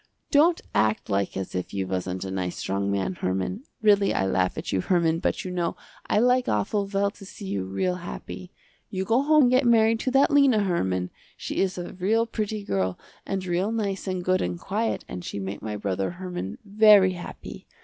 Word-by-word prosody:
Don't 325 +4 +4
act 110 0 +1
like 100 0 0
as 95 - -5
if 90 +2 -4
you 95 -1 -1
wasn't 95 0 -3
a 95 - -5
nice 90 -2 -3
strong 100 +1 -2
man, 100 - -1
Herman. 95 - -2 0.2
Really 205 -2 +4
I 95 - +1
laugh 95 -1 0
at - - -4
you 95 - +1
Herman, 165 - +2
but - - -1
you 185 - -4
know 175 -2 -2 0.3
I - - +2
like 250 +3 +3
awful 195 - 0
well 200 0 +1
to 200 - -15
see 195 +1 -10
you 100 - -2
real 180 - -1
happy. 180 +1 -8 0.4
You 190 -1 -3
go 230 +5 +3
home 305 +1 +5
and 245 - +4
get 255 +2 +4
married 225 -1 +4
to 260 - -1
that 270 +4 +4
Lena, 275 -7 +5
Herman. 95 - -1 0.3
She - - -5
is 190 -1 0
a 175 - -6
real 215 +5 +1
pretty 215 -2 -3
girl 95 - -1 0.3
and 190 -1 -2
real 180 +4 0
nice 200 -4 -2
and 185 -1 -2
good 185 0 +2
and 90 -1 -2
quiet 220 +4 -2
and 90 - -7
she - - -5
make 95 0 -5
my 105 -1 -4
brother 95 -2 -2
Herman 180 - -6
very 205 -2 +6
happy. 175 - -9
185 Hz, 205 wpm, -25 LUFS, -, 0.4 s, very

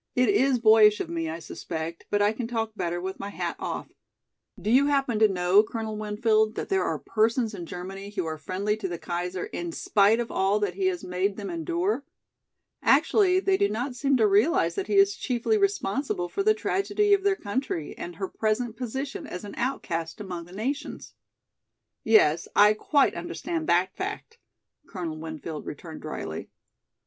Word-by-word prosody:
"It 250 0 +3
is 275 -10 +3
boyish 215 -2 +6
of - - -3
me, 165 -1 -2
I 160 - -4
suspect, 165 0 -6
but 205 0 +2
I 205 +1 +3
can 230 +1 -4
talk 225 -2 -2
better 175 -3 -2
with 190 +2 -5
my 200 - -5
hat - - -3
off. - - -4 0.7
Do 205 +4 -1
you 270 +4 +5
happen 275 -6 +1
to 220 - +7
know, 185 +1 +4
Colonel 220 0 -5
Winfield, 215 +1 +1
that - - -4
there 390 -1 +2
are - - -1
persons 225 +1 0
in 175 -4 -7
Germany 195 +3 -7
who 195 -4 -3
are 160 -1 -4
friendly 195 +7 -1
to 210 -3 -3
the 175 -2 -4
Kaiser 180 +2 -3
in 175 -1 -5
spite 205 +6 +3
of 235 - -3
all 195 +2 +2
that 205 - -1
he 385 -1 0
has 365 -2 -2
made 185 +2 -1
them 200 -3 -5
endure? 175 - -1 0.8
Actually 375 -3 +4
they 385 0 +2
do 200 - +2
not 245 +5 -3
seem 270 +2 +1
to 225 - +4
realize 230 - +3
that 390 -2 -3
he - - 0
is 395 0 +5
chiefly 250 - 0
responsible 290 - 0
for 395 - -2
the 430 +2 +4
tragedy 410 0 +1
of 400 - +4
their 400 0 +2
country 205 - -3
and 175 0 -7
her 190 +3 -3
present 220 +3 -1
position 265 +4 -5
as 180 - -7
an 205 - -8
outcast 170 -11 -3
among 180 -4 -6
the 175 - -16
nations." 260 +10 -4 0.9
"Yes, 170 -8 +4
I 210 +1 +7
quite 275 +6 +2
understand 330 -2 -4
that 180 +2 +2
fact," 420 +4 -6 0.5
Colonel 170 -5 -5
Winfield 160 -1 -6
returned 160 +2 -8
drily. 80 - -6
215 Hz, 185 wpm, -26 LUFS, 180-265 Hz, 0.9 s, to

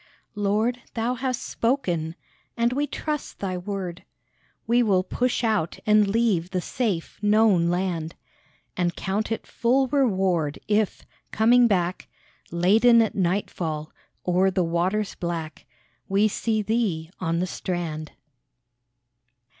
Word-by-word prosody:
Lord, 215 +4 0
Thou 235 +2 0
hast 255 0 -2
spoken, 175 - -1 0.4
and 235 +1 +2
we 290 +2 0
trust 300 -1 -4
Thy 190 -2 -3
word; 180 -1 -5 0.6
We 235 +2 +3
will 195 -5 +3
push 250 +6 -1
out 215 -7 0
and 210 -1 +5
leave 200 -5 +1
the 185 -1 -1
safe, 190 -3 -3
known 210 -5 +4
land, 175 -3 -2 0.6
And 175 -1 0
count 205 +4 -2
it 225 - -2
full 260 +3 +1
reward 190 - +1
if, 210 -1 0 0.3
coming 240 +2 +5
back 180 -4 0 0.4
Laden 215 +8 +5
at 225 -2 +2
nightfall, 170 -4 -2 0.4
o'er 180 +2 +3
the 185 -1 +1
waters 180 +5 0
black 165 -3 -5 0.4
We 200 +2 +4
see 215 0 -1
Thee 195 -8 -1
on 165 -2 -1
the 180 - +1
strand. 170 -4 -4
195 Hz, 120 wpm, -25 LUFS, 175-225 Hz, 0.6 s, and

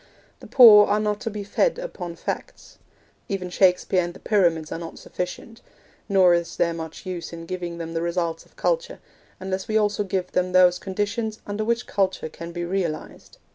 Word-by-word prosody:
The - - -12
poor 215 -5 +9
are 205 +1 +2
not 210 -1 -1
to - - -2
be 210 -1 -5
fed 475 - +1
upon 185 - -6
facts. - - -7 0.5
Even 185 -3 -3
Shakespeare 180 0 +3
and 175 0 -6
the - - -12
Pyramids 170 -7 +1
are - - -4
not 165 -1 -8
sufficient; 180 +5 -6 0.5
nor 190 -3 +5
is 170 -1 -1
there 170 -1 +1
much 160 +3 -8
use 180 -2 -5
in 165 0 -8
giving 175 -1 -5
them 165 -1 -6
the 165 - -1
results 170 -1 -2
of - - -27
culture, - - -1 0.4
unless 190 +1 -4
we 220 -1 +1
also 210 -1 +1
give 190 -2 -3
them 180 0 0
those 180 -1 +5
conditions 210 +3 -3
under 205 +1 -3
which 235 +2 0
culture 190 -4 -1
can 170 +2 -9
be 175 0 -4
realised. 175 -4 -4
185 Hz, 185 wpm, -24 LUFS, 170-210 Hz, 0.5 s, poor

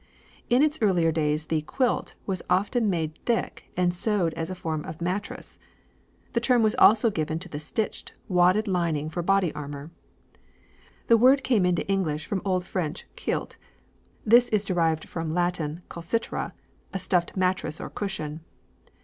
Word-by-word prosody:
In 245 +4 +5
its 305 0 +1
earlier 175 -6 +3
days 155 -1 0
the 155 -1 0
"quilt" 250 - -1
was 190 -2 -2
often 210 +3 +2
made 160 -4 -2
thick 235 -1 -1
and 175 -1 +2
sewed 180 -3 +1
as 160 - -4
a 185 - -4
form 160 -4 -3
of 160 - -8
mattress. 185 +4 -4 0.7
The 235 - +2
term 240 -1 +3
was 215 0 +3
also 220 +1 +6
given 155 -3 -2
to 175 -2 -7
a - - -3
stitched, 210 +8 -3
wadded 185 +3 +3
lining 165 -5 0
for 175 - -2
body 195 -1 +2
armour. 145 +1 -7 1.1
"The 230 - +6
word 265 +4 +5
came 210 -8 +3
into 175 -3 0
English 160 -6 0
from 190 +3 -2
old 185 -2 0
French 175 -3 -3
cuilte. - - -3 0.7
This 240 +2 +6
is 210 -1 +1
derived 165 -4 0
from 165 -1 -4
Latin 175 -2 -1
culcitra, 170 +7 -3 0.4
a - - -2
stuffed 180 -1 0
mattress 185 -4 0
or - - -6
cushion. 165 -6 -4
180 Hz, 160 wpm, -26 LUFS, 160-210 Hz, 1.1 s, also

